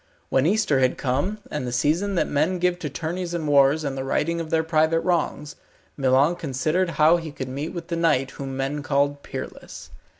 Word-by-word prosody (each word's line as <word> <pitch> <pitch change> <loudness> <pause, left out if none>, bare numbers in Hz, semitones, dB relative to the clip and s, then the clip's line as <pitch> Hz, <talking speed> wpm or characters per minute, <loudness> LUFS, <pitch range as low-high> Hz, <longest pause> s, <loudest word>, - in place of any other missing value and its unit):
When 135 +3 +2
Easter 195 -8 +2
had 130 -1 +2
come, 140 +11 -1
and 150 -4 -3
the - - -3
season 160 +11 +1
that - - +1
men 155 +6 +1
give 180 0 0
to 150 - -4
tourneys 170 +4 -4
and 160 -3 -3
wars 145 +2 +4
and 140 -2 -3
the 135 - -3
righting 165 +5 0
of 160 - -6
their 160 0 +2
private 160 0 +2
wrongs, 160 -4 -1 0.4
Milon 135 +5 +3
considered 155 +5 0
how 155 +3 +6
he 165 -2 -6
could 130 -2 -6
meet 140 +5 -4
with 170 -2 -7
the 170 - -1
knight 150 -6 +1
whom 135 -1 -6
men 135 +2 -2
called 145 0 0
Peerless. 130 -2 -8
150 Hz, 200 wpm, -24 LUFS, 135-170 Hz, 0.4 s, how